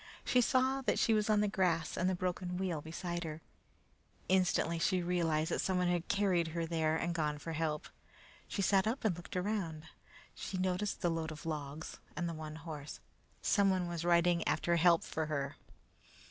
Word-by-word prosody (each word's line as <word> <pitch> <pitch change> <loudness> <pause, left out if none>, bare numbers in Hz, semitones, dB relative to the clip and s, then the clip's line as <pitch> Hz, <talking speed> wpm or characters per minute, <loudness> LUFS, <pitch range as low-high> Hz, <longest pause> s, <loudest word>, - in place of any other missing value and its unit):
She 250 - +4
saw 260 +2 +2
that 225 -6 +1
she 225 - +3
was 215 0 +2
on 210 -1 +4
the 210 - +2
grass 180 -5 +1
and 185 - +1
the 190 - +1
broken 180 0 -2
wheel 180 -5 -1
beside 170 +2 -4
her. 155 -1 -5 0.9
Instantly 180 -3 +2
she 185 +1 +2
realized 165 -3 +1
that - - +1
someone 180 -1 +1
had 175 -1 0
carried 190 -4 +2
her 165 +1 -2
there 160 -1 +1
and 170 +1 -1
gone 150 -3 0
after 165 +3 -6
help. 155 -1 -1 0.6
She 200 - -2
sat 195 +1 +3
up 230 +2 -2
and 195 -6 +3
looked 175 +2 -7
around. 180 -5 -2 0.5
She 190 - -5
noticed 185 +2 -1
the 175 -2 +2
load 160 -1 -2
of 155 - -9
logs 150 -1 -5 0.2
and 175 - -1
the 170 - -3
one 155 -1 -6
horse. 155 -2 -7 0.4
Someone 190 -3 +3
was 170 -1 -3
riding 170 0 +3
after 170 - +2
help 170 0 +5
for 160 -1 -3
her! 140 -2 -2
175 Hz, 185 wpm, -34 LUFS, 160-190 Hz, 0.9 s, help